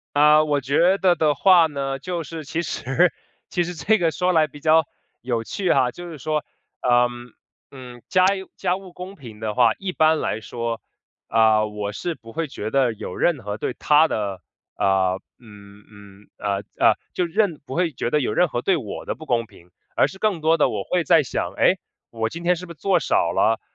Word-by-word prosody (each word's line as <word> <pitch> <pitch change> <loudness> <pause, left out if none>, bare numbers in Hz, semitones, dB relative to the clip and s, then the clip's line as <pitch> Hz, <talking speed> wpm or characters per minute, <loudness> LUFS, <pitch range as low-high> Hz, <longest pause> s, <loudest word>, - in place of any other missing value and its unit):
呃， 150 +1 +6
我 145 -2 0
觉 160 +8 +3
得 185 -2 +4
的 155 -3 +2
话 175 +2 +5
呢， 135 -3 -3
就 175 0 -4
是 160 0 -8
其 165 +4 -3
实 170 +4 +1 0.4
其 175 - +1
实 175 +1 -4
这 215 +5 +2
个 170 -2 +2
说 180 +4 0
来 160 -2 +4
比 145 0 -13
较， 160 0 +4 0.3
有 120 -2 -2
趣 185 - -1
哈。 125 - +3
就 175 +7 -9
是 155 - -9
说， 150 +3 -2 0.4
呃， 120 0 +4 0.6
嗯， 125 -3 -11
家 185 -1 +3 0.3
家 180 -1 0
务 190 -2 -12
公 180 +2 -9
平 115 - -12
的 110 -1 -3
话， 120 -3 +4
一 195 -2 -4
般 155 -1 +3
来 110 - -2
说， 115 0 -4 0.5
啊， 110 -1 +4
我 105 -1 -5
是 170 - -4
不 115 -6 -14
会 165 +6 -2
觉 110 -4 -5
得 130 -3 +2
有 95 -3 -7
任 150 -8 +1
何 105 +1 -5
对 - - -3
她 150 +2 +4
的， 100 -6 -3 0.4
呃， 95 -1 +1 0.2
嗯， 105 -3 -16
嗯， 100 -1 -16
呃， 100 -1 -1 0.2
呃， - - +5 0.2
就 180 - 0
任 175 -2 0
不 130 - -6
会 175 -3 0
觉 120 - -3
得 150 - +2
有 125 - -1
任 180 +9 +3
何 120 -2 -3
对 190 - +2
我 - - -7
的 - - -3
不 155 - -12
公 120 -3 0
平， 90 -4 -20 0.2
而 - - +3
是 190 - -12
更 205 -6 0
多 160 +2 +3
的 - - +3
我 - - -3
会 180 -2 0
在 165 0 +5
想： 130 - -3
“哎， - - +4 0.3
我 115 -1 -2
今 170 - -8
天 175 +1 +2
是 180 - -8
不 170 - -9
做 180 +3 +1
少 - - +1
了， - - +2
150 Hz, 225 characters per minute, -22 LUFS, 115-175 Hz, 0.6 s, 呃